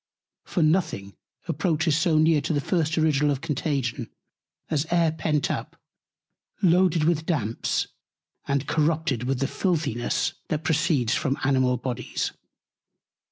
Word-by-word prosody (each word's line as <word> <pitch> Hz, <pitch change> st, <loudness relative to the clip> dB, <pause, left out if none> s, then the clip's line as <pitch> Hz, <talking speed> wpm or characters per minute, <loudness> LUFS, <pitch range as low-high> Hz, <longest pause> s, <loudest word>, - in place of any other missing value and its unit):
For 175 Hz, -, 0 dB
nothing 155 Hz, -, 0 dB, 0.3 s
approaches 160 Hz, -1 st, +1 dB
so 160 Hz, 0 st, +2 dB
near 155 Hz, -1 st, +4 dB
to 155 Hz, -, -2 dB
the 145 Hz, -, +1 dB
first 160 Hz, +1 st, 0 dB
Original 150 Hz, -2 st, +3 dB
of 140 Hz, -2 st, -1 dB
Contagion, 140 Hz, -5 st, -2 dB, 0.6 s
as 155 Hz, 0 st, -1 dB
Air 170 Hz, -2 st, +3 dB
pent 155 Hz, -2 st, 0 dB
up, -, -, -5 dB, 0.8 s
loaded 175 Hz, -2 st, +4 dB
with 160 Hz, 0 st, +1 dB
Damps, 115 Hz, -, 0 dB, 0.6 s
and 140 Hz, 0 st, 0 dB
corrupted 155 Hz, -5 st, 0 dB
with 135 Hz, +1 st, 0 dB
the 135 Hz, -, +2 dB
Filthiness, 150 Hz, -, -1 dB, 0.2 s
that 155 Hz, 0 st, -1 dB
proceeds 150 Hz, -6 st, +1 dB
from 135 Hz, -1 st, 0 dB
Animal 130 Hz, -2 st, +2 dB
Bodies. 125 Hz, 0 st, -3 dB
150 Hz, 125 wpm, -25 LUFS, 135-160 Hz, 0.8 s, near